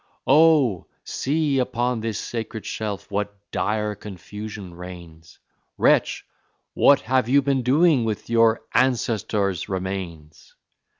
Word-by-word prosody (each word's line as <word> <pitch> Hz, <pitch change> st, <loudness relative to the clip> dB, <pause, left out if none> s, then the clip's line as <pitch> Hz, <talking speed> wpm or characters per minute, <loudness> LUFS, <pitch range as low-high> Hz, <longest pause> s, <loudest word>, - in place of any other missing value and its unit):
Oh, 145 Hz, -, +4 dB, 0.2 s
see, 145 Hz, -1 st, 0 dB
upon 125 Hz, -1 st, -1 dB
this 110 Hz, -2 st, -3 dB
sacred 110 Hz, -3 st, -5 dB
shelf 105 Hz, -1 st, -5 dB
what 105 Hz, 0 st, -3 dB
dire 105 Hz, 0 st, -1 dB
confusion 105 Hz, -1 st, -9 dB
reigns! 85 Hz, -2 st, -11 dB, 0.4 s
Wretch! -, -, +2 dB, 0.5 s
What 140 Hz, -, +5 dB
have 130 Hz, 0 st, 0 dB
you 140 Hz, +1 st, +4 dB
been 135 Hz, -1 st, +1 dB
doing 140 Hz, +2 st, +3 dB
with 110 Hz, -2 st, -3 dB
your 115 Hz, -1 st, +3 dB
ancestors' 110 Hz, -6 st, 0 dB
remains? 90 Hz, -5 st, -6 dB
110 Hz, 110 wpm, -23 LUFS, 100-130 Hz, 0.5 s, What